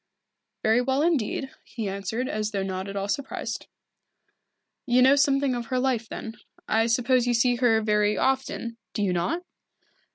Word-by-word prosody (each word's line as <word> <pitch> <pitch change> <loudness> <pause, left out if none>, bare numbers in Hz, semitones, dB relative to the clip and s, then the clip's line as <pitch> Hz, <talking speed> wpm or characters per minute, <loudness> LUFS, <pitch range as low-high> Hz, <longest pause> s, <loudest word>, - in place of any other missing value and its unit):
"Very 220 +3 +4
well 265 +3 +1
indeed," 275 -4 0
he 225 -4 -5
answered, 200 +6 -3
as 215 -2 -2
though 200 -3 -2
not 190 0 -4
at 200 - -6
all 200 0 -2
surprised. 280 +6 -4 1.2
"You 250 0 +5
know 265 +2 +6
something 275 -1 +2
of 240 -1 -4
her 255 - -1
life, 250 -4 0
then. 225 0 -7 0.3
I 225 +1 +2
suppose 245 +1 +2
you 240 - +2
see 245 +1 +3
her 235 -3 +3
very 210 -1 +2
often, 260 -3 -1 0.2
do 210 - 0
you 185 -3 +1
not?" 310 - -1
235 Hz, 165 wpm, -26 LUFS, 210-260 Hz, 1.2 s, know